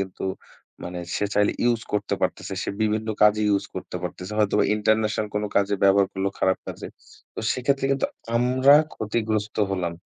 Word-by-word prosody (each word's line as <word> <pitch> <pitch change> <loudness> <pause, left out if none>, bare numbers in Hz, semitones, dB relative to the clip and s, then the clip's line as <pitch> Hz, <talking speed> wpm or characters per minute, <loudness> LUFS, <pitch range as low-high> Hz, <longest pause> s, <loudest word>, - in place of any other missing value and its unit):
কিন্তু 95 -1 -5 0.6
মানে 90 0 -5 0.2
সে - - 0
চাইলে 105 0 +3
ইউস 120 -1 +2
করতে 105 - 0
পারতেছে। - - -2
সে - - -2
বিভিন্ন 110 +1 0
কাজে 105 0 +5
ইউস 100 -1 +2
করতে - - -6
পারতেছে। 90 +2 -6
হয়তোবা 105 -2 +3
ইন্টারন্যাশনাল 110 0 +1
কোনো 105 0 0
কাজে 100 0 +2
ব্যবহার 100 0 +5
করলো 95 0 -1
খারাপ 95 0 +2
কাজে - - -7 0.5
তো - - -4
সেক্ষেত্রে 135 +2 0
কিন্তু 135 - 0 0.3
আমরা 130 +3 +4 0.2
ক্ষতিগ্রস্ত 110 -1 -2
হলাম 90 -3 -1
105 Hz, 160 wpm, -24 LUFS, 100-110 Hz, 0.6 s, কাজে